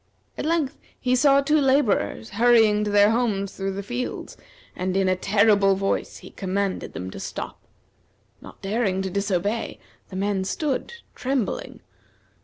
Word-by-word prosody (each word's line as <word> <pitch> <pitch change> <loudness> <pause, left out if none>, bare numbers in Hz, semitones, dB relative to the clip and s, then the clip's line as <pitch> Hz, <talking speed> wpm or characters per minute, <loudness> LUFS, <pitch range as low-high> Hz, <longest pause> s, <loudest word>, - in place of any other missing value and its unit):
At - - -3
length 320 -5 0 0.2
he 255 -1 +1
saw 275 +2 +5
two 300 +2 +2
laborers 235 - +1
hurrying 220 -2 +4
to - - -1
their 205 +1 +5
homes 210 -5 0
through 195 0 -3
the 200 +1 -5
fields, 245 +4 -4 0.4
and 185 +1 -1
in 195 -1 +2
a 185 - +3
terrible 200 0 +3
voice 195 +1 -2
he - - -11
commanded 195 0 -2
them 95 0 -6
to - - -8
stop. - - -6 0.8
Not - - -14
daring 195 -2 0
to 190 - -3
disobey, 200 +3 -1 0.3
the 185 - -9
men 195 0 0
stood, 275 - -2 0.2
trembling. 270 - -2
205 Hz, 150 wpm, -24 LUFS, 195-250 Hz, 0.8 s, saw